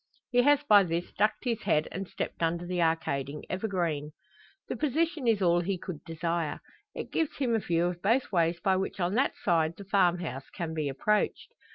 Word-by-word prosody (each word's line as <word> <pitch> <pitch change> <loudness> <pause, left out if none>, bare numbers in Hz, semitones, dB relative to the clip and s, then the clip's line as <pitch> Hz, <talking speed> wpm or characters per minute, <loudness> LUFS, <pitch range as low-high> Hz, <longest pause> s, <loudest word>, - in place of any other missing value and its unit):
He 245 0 +5
has 290 +2 +4
by 210 -7 +7
this 170 0 -3
ducked 210 +2 +1
his 235 -4 -1
head, 155 0 +1
and 190 +1 -5
stepped - - -5
under 170 +1 0
the 180 0 -1
arcading 150 -3 -1
evergreen. 170 -7 -2 0.5
The - - -3
position 310 -1 0
is 215 -4 +3
all 175 -1 +4
he 185 +2 -1
could 170 -3 -7
desire. 165 -1 -2 0.4
It - - -6
gives 320 -3 -1
him 255 -4 0
a 225 - +3
view 170 -3 +1
of 175 0 -3
both 230 +6 +2
ways 170 -2 +2
by 190 +2 +2
which 190 +1 -3
on 175 +1 0
that 260 +5 +2
side 165 -3 +2
the 200 - -9
farmhouse 175 -8 +1
can 165 -2 -5
be 155 -3 -1
approached. 210 +10 0
180 Hz, 195 wpm, -29 LUFS, 165-210 Hz, 0.5 s, by